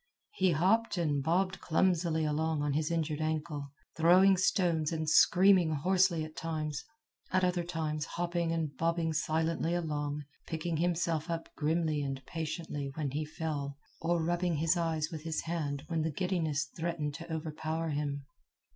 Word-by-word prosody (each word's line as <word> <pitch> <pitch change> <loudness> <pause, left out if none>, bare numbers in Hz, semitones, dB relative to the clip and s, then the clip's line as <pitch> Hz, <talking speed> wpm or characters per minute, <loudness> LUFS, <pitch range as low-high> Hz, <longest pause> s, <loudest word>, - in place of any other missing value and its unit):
He 190 - +2
hopped 195 +7 +2
and 150 -5 +1
bobbed 185 +5 +1
clumsily 165 -2 +2
along 155 0 0
on 145 -1 0
his 155 +1 0
injured 160 -2 -1
ankle, 155 -2 -2 0.3
throwing 180 +4 +6
stones 175 -4 +2
and 160 -1 -2
screaming 180 +1 +5
hoarsely 180 +1 +2
at 155 - -11
times; 155 -2 -3 0.5
at 185 0 +2
other 180 -1 +1
times 155 -3 -2
hopping 170 0 -1
and 160 -3 -2
bobbing 165 -1 0
silently 160 +2 0
along, 150 -3 -2 0.2
picking 165 0 -2
himself 170 -1 0
up 165 -1 -3
grimly 155 -1 +1
and 135 -1 -4
patiently 160 -3 -4
when 150 -4 -2
he 150 +3 -2
fell, 150 -3 -4 0.2
or 170 0 +1
rubbing 175 0 +1
his 160 +3 +2
eyes 165 -2 0
with 160 -2 -5
his 160 -1 -2
hand 150 -4 -3
when 165 -2 0
the 160 - 0
giddiness 160 -4 0
threatened 165 -3 -2
to 165 +3 -8
overpower 160 +1 -3
him. 145 -1 -2
160 Hz, 155 wpm, -32 LUFS, 150-170 Hz, 0.5 s, throwing